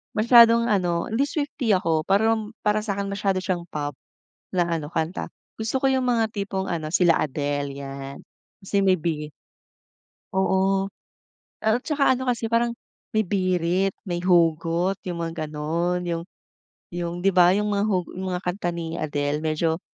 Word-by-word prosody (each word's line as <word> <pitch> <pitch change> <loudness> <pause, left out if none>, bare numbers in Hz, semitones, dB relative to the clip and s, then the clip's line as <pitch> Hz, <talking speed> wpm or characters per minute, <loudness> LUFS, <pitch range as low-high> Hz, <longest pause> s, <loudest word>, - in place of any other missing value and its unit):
masyadong 235 +1 +6
ano, 175 -5 +1
hindi 235 +5 +1
swifty 285 -5 -1
ako. 165 -5 +2
Parang, 220 +3 +1
para 210 0 +1
sa 200 -2 -2
'kin 200 - -2
masyado 195 -1 0
siyang 185 -2 -2
pop, 145 -2 -3 0.6
na 180 - +3 0.2
ano 145 - -6
kanta. 160 +3 -2 0.3
Gusto 225 +5 -2
ko - - +4
'yong 260 -1 +1
mga 225 -3 +2
tipong 195 -2 -3
ano, 160 -1 -3
sila 175 -3 +4
Adele 145 0 -2
'yan, 140 0 -7 0.5
kasi 200 +1 -1
may 185 - +6
bi 155 -3 -3 1.0
oo, 190 0 +2 0.7
a 220 +2 +3
at - - -13
saka 295 -4 +2
ano 260 - -4
kasi 235 -2 -1
parang, 235 0 +2 0.4
may 215 - +3
birit, 185 -1 +1
may 175 -3 -3
hugot, 175 +1 +2
'yong 175 -2 -3
mga 165 -1 -3
gano'n. 165 +4 -1
'Yong 170 -1 -3 0.7
'yong, 175 -1 -3
'di 195 - +4
ba, 175 -1 +6
'yong 210 - +1
mga 205 0 +1
hu 185 -3 +1
'yong 185 +1 -5
mga 180 0 -3
kanta 180 0 -2
ni 170 -1 -5
Adele 145 -1 -1
medyo 160 +1 0
185 Hz, 165 wpm, -24 LUFS, 165-210 Hz, 1.0 s, masyadong